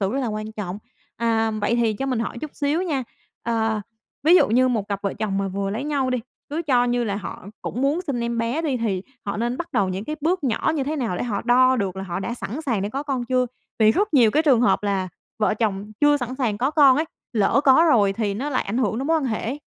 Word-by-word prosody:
sự 195 +2 0
rất 270 - -1
là 250 - -1
quan 215 0 -4
trọng. 200 -2 -5 0.4
À, 225 -1 +1
vậy 215 +1 0
thì 230 -2 +2
cho 270 +5 -3
mình 255 -4 0
hỏi 230 +1 -3
chút 305 - -5
xíu 295 +5 0
nha. 290 -8 -1 0.4
Ờ, 225 -2 0 0.4
ví 335 +4 +6
dụ - - +4
như 255 +3 +4
một 215 -5 -1
cặp 200 0 -3
vợ 200 - -2
chồng 195 -3 -2
mà 195 0 -1
vừa 195 +1 -2
lấy 230 +7 -3
nhau 275 -4 0
đi, 255 - +1 0.3
cứ 320 +3 -2
cho 250 -5 +3
như 245 0 +1
là 200 -2 -2
họ 190 -1 -7 0.2
cũng 250 - -3
muốn 290 +5 +2
sinh 250 -4 -1
em 235 0 -2
bé 240 +8 -1
đi, 280 -5 0
thì 200 -6 -1 0.2
họ 200 - -2
nên 240 +3 -1
bắt 345 0 -6
đầu 195 -2 +2
những 190 +3 -4
cái 305 0 -4
bước 335 0 0
nhỏ 250 +5 +1
như 275 -3 -1
thế 305 +2 -2
nào 225 -10 -1
để - - -2
họ 215 -5 -2
đo 255 +1 +5
được 195 -4 -2
là 190 - -4
họ 180 0 -4
đã 235 - -3
sẵn 255 +6 -5
sàng 230 -9 -1
để 205 - -1
có 275 +6 -3
con 265 -4 -2
chưa? 255 0 +1 0.3
Vì 215 -1 +6
rất 405 - 0
nhiều 235 -6 +6
cái 305 +6 +2
trường 265 -7 +4
hợp 245 - +3
là 195 -2 -1 0.3
vợ 210 - +2
chồng 205 -3 -1 0.2
chưa 290 0 +5
sẵn 250 -1 -4
sàng 230 -6 -1
có 265 +4 +1
con 280 -4 +6
ấy, 310 - +1 0.3
lỡ 220 +5 +3
có 275 +5 +6
rồi 205 -6 +4
thì 205 -1 -1
nó 275 +7 -3
lại 255 - +1
ảnh 215 +5 -2
hưởng 245 -3 0
đến 270 - -2
mối 325 0 +3
quan 300 - -1
hệ 220 -4 -1
ấy. 270 +6 -3
240 Hz, 275 wpm, -23 LUFS, 210-275 Hz, 0.4 s, ví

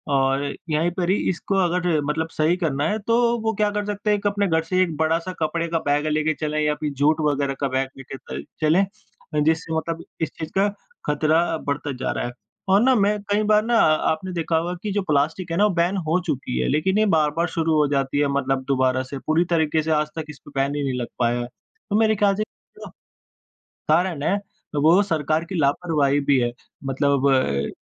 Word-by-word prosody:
और 135 +1 +2 0.3
यहीं 160 +3 +1
पर 175 0 -2
ही 195 - +4
इसको 190 +2 -2
अगर 180 0 0 0.2
मतलब 160 +2 -1
सही 155 +3 +2
करना 150 -6 -1
है, 210 - 0
तो 230 +3 0 0.3
वो 220 0 0
क्या 210 0 +1
कर 205 0 -2
सकते 205 +1 -3
हैं 210 - +3
एक 200 - -11
अपने 205 0 +1
घर 160 -2 +1
से 185 +3 +1
एक 165 -4 -3
बड़ा-सा 165 +3 0
कपड़े 165 +2 -1
का 165 0 0
बैग 145 +1 +1
लेके 155 +1 +1
चलें 155 0 -1
या 150 0 +2
फिर 150 0 -3
जूट 155 +2 +3
वगैरह 140 -1 -1
का 140 - 0
बैग 130 0 -1
लेके 135 0 -8
तइ 70 - -7 0.2
चलें, 160 +6 +4 0.6
जिससे 160 +1 0
मतलब 165 +1 -3 0.2
इस 160 - 0
चीज़ 155 -1 -4
का 200 +1 +4 0.4
खतरा 155 +2 +2
अ, - - 0
बढ़ता 145 0 -2
जा 130 - -2
रहा - - -2
है। 120 - -4 0.4
और 195 +3 +5
ना 260 +1 +5
मैं 210 0 +2
कई 210 +1 +2
बार 210 0 +4
ना 235 0 +2
आपने 160 +1 +2
देखा 165 -1 0
होगा 175 +2 -1
कि 210 - -2
जो 205 - +1
प्लास्टिक 160 +5 0
है 165 - -1
ना 205 - +4
वो 205 - +1
बैन 180 +3 +1
हो 165 +4 +2
चुकी 135 -6 -2
है - - 0
लेकिन 165 +7 +1
ये 215 - +4
बार-बार 155 +3 +1
शुरू 165 -1 0
हो 150 -1 +3
जाती 140 0 0
है 145 - +3
मतलब 135 -1 0
दोबारा 130 -1 +1
से 130 +2 -7
पूरी 160 +3 +3
तरीके 160 -1 +2
से 160 - -1
आज 150 -1 +2
तक 160 - -3
इस 150 - -10
पर - - -12
बैन 140 +1 -1
ही 145 - -2
नहीं 130 -2 -2
लग 120 - -3
पाया 120 0 +1
है। 120 - -4 0.4
तो - - +2
मेरे 220 -1 +3
ख़याल 200 -1 +2
से 215 - -1 0.4
जो - - -8 1.0
कारण 165 -1 +2
है 185 - +2 0.5
वो 170 +5 +6
सरकार 155 -3 0
की 185 +2 -6
लापरवाही 145 -1 +1
भी 140 -1 +2
है, 120 -1 0 0.4
मतलब 140 0 +1
अ, 70 - +1
160 Hz, 225 wpm, -23 LUFS, 140-180 Hz, 1.0 s, वो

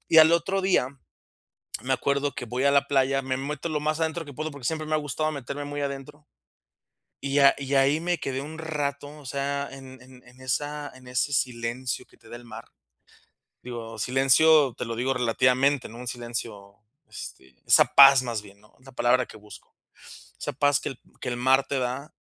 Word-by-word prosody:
y 160 - +6
al 160 0 +8
otro 190 +3 +1
día, 185 -9 +2 1.0
me 130 +1 +1
acuerdo 140 +2 0
que - - -5
voy 125 +3 -3
a 140 - +5
la 140 0 +3
playa, 135 -1 +2
me 130 0 -2
meto 145 +4 -4
lo 155 -1 -1
más 155 +1 -1
adentro 160 +1 -1
que 145 - -10
puedo, 155 +4 -4
porque 140 -4 -10
siempre 155 0 -2
me 155 - -2
ha - - +2
gustado 150 +2 -2
meterme 140 0 -6
muy 145 0 -4
adentro, 140 +2 -6 0.9
y 140 +1 0
a 140 -1 +6
y 140 0 -4
ahí 140 +3 +4
me 175 0 -1
quedé 135 -2 -3
un 155 +3 -8
rato, 145 -3 -3
o 145 - -15
sea, 140 +1 -2
en 130 -1 -11
en 130 0 -16
en 125 +1 -18
esa 145 +3 -3
en 130 -1 -15
ese 125 +3 -1
silencio 125 0 -2
que - - -24
te 115 - -19
da 120 - -8
el 120 - -15
mar, 115 0 -10 1.0
digo, 115 -2 -7
silencio 135 +2 +4
te - - -5
lo 115 - -4
digo 130 +3 0
relativamente, 130 +3 +2
¿no?, 115 - -11
un 125 - -8
silencio, 115 -4 -6 0.3
este, 65 0 -10
esa - - +7
paz 135 -2 +9
más 115 -4 -3
bien, 100 -1 -16
¿no?, 105 - -24
es 130 - -24
la 135 - -13
palabra 125 +1 +2
que - - -12
busco, 105 0 -15 0.6
esa - - -4
paz 145 +1 +2
que - - -4
el 135 - -9 0.2
que 125 - -3
el 120 - -3
mar 130 +2 +3
te 140 - -1
da, 130 +6 -4
135 Hz, 205 wpm, -26 LUFS, 125-145 Hz, 1.0 s, paz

